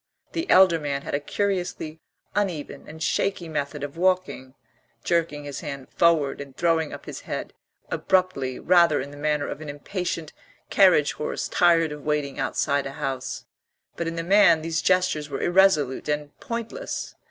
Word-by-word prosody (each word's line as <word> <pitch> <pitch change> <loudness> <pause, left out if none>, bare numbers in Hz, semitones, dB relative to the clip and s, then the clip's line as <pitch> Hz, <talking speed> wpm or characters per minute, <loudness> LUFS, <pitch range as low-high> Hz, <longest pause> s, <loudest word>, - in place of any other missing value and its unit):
The 330 +2 -3
elder 185 -3 +6
man 140 -2 -3
had - - -6
a 140 - +2
curiously 175 -1 -2 0.3
uneven 180 -8 -3
and 160 +1 -7
shaky 190 -2 0
method 145 -2 -3
of 145 +2 -6
walking, 180 -8 0 0.5
jerking 165 -4 0
his 145 -1 -6
hand 140 -4 -7
forward 160 -5 +2
and 140 -2 -11
throwing 165 -2 +1
up - - -9
his - - -7
head - - -5 0.4
abruptly, 180 -9 +1
rather 170 -4 +4
in 140 - -5
the - - -11
manner 150 0 0
of - - -6
an 155 - -7
impatient 165 +2 -4 0.4
carriage 180 -7 +5
horse 150 - -3
tired 165 -3 +3
of 150 0 -7
waiting 145 -2 -2
outside 140 +1 0
a 135 - -7
house; 135 -4 -4 0.5
but 170 - -3
in 165 - -3
the 165 - -2
man 175 -3 +5
these 165 0 -1
gestures 180 -5 +1
were 135 - -4
irresolute 175 -8 +3
and 150 0 -2
pointless. 235 - -5
155 Hz, 165 wpm, -25 LUFS, 145-180 Hz, 0.5 s, elder